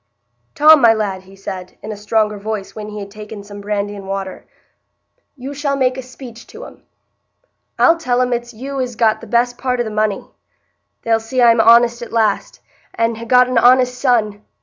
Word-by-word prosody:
"Tom, 310 -1 +7
my 230 -1 +6
lad," 200 -3 -3
he 195 +1 -16
said, 185 -1 -8
in 215 - -6
a - - -5
stronger 210 0 -1
voice, 210 -1 -5
when 210 -1 -8
he 210 - -8
had 200 -1 -8
taken 210 0 -10
some 205 0 -10
brandy 205 0 -3
and 195 -1 -10
water, 195 -1 -6 0.9
"you 270 +1 -7
shall 285 -1 -2
make 260 -2 +1
a 260 - -5
speech 250 -2 -12
to 485 +3 -11
'em. - - -14 1.0
I'll 335 - +4
tell 250 -5 0
'em 250 -1 +1
it's 240 0 -4
you 265 +4 -5
as 250 -2 -4
got 220 -1 +1
the - - -11
best 245 +1 0
part 250 -1 -1
o' - - +1
the 220 - -6
money. 215 -1 -1 0.8
They'll 225 -1 +2
see 225 +4 -4
I'm 230 -2 +5
honest 235 +1 +5
at 235 - -8
last, 220 -3 -1 0.3
and 230 0 -1
ha' 230 - -8
got 250 +1 +5
an 255 -2 +2
honest 250 +1 +4
son. 215 -6 +1
230 Hz, 200 wpm, -17 LUFS, 210-250 Hz, 1.0 s, Tom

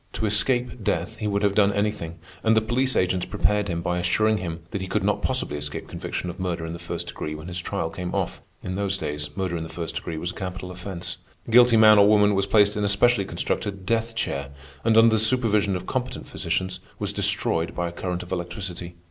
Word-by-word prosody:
To 110 - -2
escape 120 +3 +1
death 85 -2 -1
he 110 - -3
would 100 0 0
have 100 -1 +3
done 100 -1 +4
anything, 100 -5 -1 0.3
and 110 0 +4
the - - +5
police 125 +4 0
agents 90 0 +1
prepared 105 0 +1
him 85 -2 -2
by 90 +1 0
assuring 110 +5 +2
him 85 -2 -5
that 100 - -3
he 95 - -4
could 95 - 0
not 105 +1 +1
possibly 130 - -1
escape 75 0 -5
conviction - - -4
of 85 - -6
murder 85 -3 -2
in 80 - -5
the 85 - -7
first 85 - -5
degree 75 0 -5
when 80 +2 -9
his 90 0 -3
trial 80 -1 -3
came 90 +1 -4
off. - - -2 0.2
In 90 - -3
those 100 0 -1
days, 75 -3 -4
murder 95 -3 -1
in - - -4
the 80 - -6
first 80 0 -5
degree 85 -1 -4
was 85 +3 -3
a - - -12
capital 90 -1 -6
offense. 90 0 -6 0.3
The - - -7
guilty 120 0 +7
man 110 -1 +8
or 100 - +7
woman 105 -1 +5
was 100 0 +1
placed 105 0 +4
in 105 - -1
a 100 - +2
specially 100 +1 +3
constructed 100 0 -3
death 115 +2 0
chair, 70 -10 -2 0.3
and, 110 -1 +4
under 115 0 +7
the 110 - +3
supervision 110 -4 +3
of 90 - -4
competent - - -3
physicians, 95 0 -2 0.2
was 105 -1 -1
destroyed 100 -5 +1
by 90 -1 -1
a - - -5
current 90 +1 -4
of 90 - -13
electricity. 90 -1 -5
95 Hz, 230 wpm, -25 LUFS, 85-105 Hz, 0.3 s, man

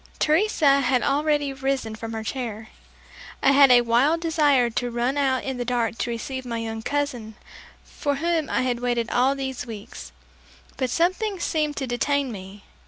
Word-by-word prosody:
Teresa 310 -4 +3
had 255 -2 +1
already 290 0 +1
arisen 265 -4 -2
from 225 +1 -7
her 220 0 -4
chair. 225 -3 -5 0.7
I 275 - +6
had 280 0 +7
a 245 -1 +7
wild 245 +8 +2
desire 295 -7 +2
to 245 +2 -2
run 240 +3 -1
out 270 -3 +1
in 265 -2 -4
the 245 - -2
dark 235 -2 -1
to - - -1
receive 260 +3 -4
my 235 -2 -4
young 225 -1 -4
cousin 245 -5 -3 0.5
for 285 -1 -3
whom 325 +1 -1
I - - 0
had 245 -2 -1
waited 240 -1 -1
all 260 +3 +2
these 265 -2 -5
weeks, 205 - -9 0.6
but 260 - -1
something 370 - 0
seemed 305 -3 -1
to 270 - -2
detain 270 +2 0
me. 195 0 -10
260 Hz, 170 wpm, -24 LUFS, 235-285 Hz, 0.7 s, had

